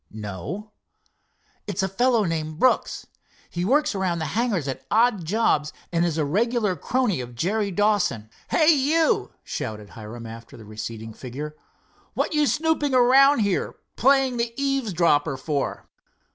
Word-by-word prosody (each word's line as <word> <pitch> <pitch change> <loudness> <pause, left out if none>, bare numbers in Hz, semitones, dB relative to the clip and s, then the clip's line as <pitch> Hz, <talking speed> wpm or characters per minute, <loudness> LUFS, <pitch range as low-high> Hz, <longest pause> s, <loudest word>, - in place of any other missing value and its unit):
"No." 110 - -7 1.0
"It's - - -2
a - - +1
fellow 230 +4 +2
named 155 -3 -3
Brooks. 255 +8 +1 0.5
He 175 - -3
works 275 +9 +2
around 190 -3 -1
the 160 - -3
hangars 210 - 0
at 135 - -4
odd 220 -5 +2
jobs, 155 -6 +1 0.2
and 170 -1 +1
is 170 -2 0
a 155 - +1
regular 215 - +1
crony 240 - 0
of 120 -1 -9
Jerry 200 - 0
Dawson. 200 - +1 0.2
Hey, 315 0 +5
you," 310 +3 +2
shouted 105 -2 -5
Hiram 115 +1 -9
after 115 +1 -10
the 110 - -12
receding 110 +1 -7
figure, 140 +6 -7 0.6
"what - - -1
you 300 -1 +3
snooping 300 -3 +1
around 265 +1 +6
here, 200 -3 0 0.2
playing 265 -1 +3
the 235 0 -2
eavesdropper, 175 - +1
for?" 140 +1 -3
190 Hz, 145 wpm, -24 LUFS, -, 1.0 s, around